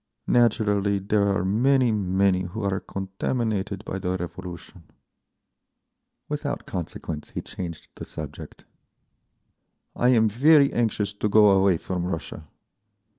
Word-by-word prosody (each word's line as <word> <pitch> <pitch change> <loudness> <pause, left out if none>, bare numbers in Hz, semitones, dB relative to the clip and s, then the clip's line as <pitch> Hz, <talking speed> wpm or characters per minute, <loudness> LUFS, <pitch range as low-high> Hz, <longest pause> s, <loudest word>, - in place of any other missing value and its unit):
Naturally 105 -4 +2
there 100 +1 +1
are 95 -2 0
many, 125 +5 +3
many 95 -2 +1
who 95 +5 -5
are 95 -1 0
contaminated 100 +1 -3
by 95 - -4
the 90 0 -2
Revolution…." 90 0 -8 1.4
Without - - -4
consequence 80 -3 -6
he - - -5
changed 85 -3 -7
the - - -9
subject. - - -9 1.3
"I 125 - +2
am 115 -3 +4
very 140 +6 +5
anxious 105 -3 0
to 105 +1 -2
go 105 0 +6
away 95 -2 +4
from 90 +1 -4
Russia. 80 -3 -6
100 Hz, 120 wpm, -25 LUFS, 95-110 Hz, 1.4 s, go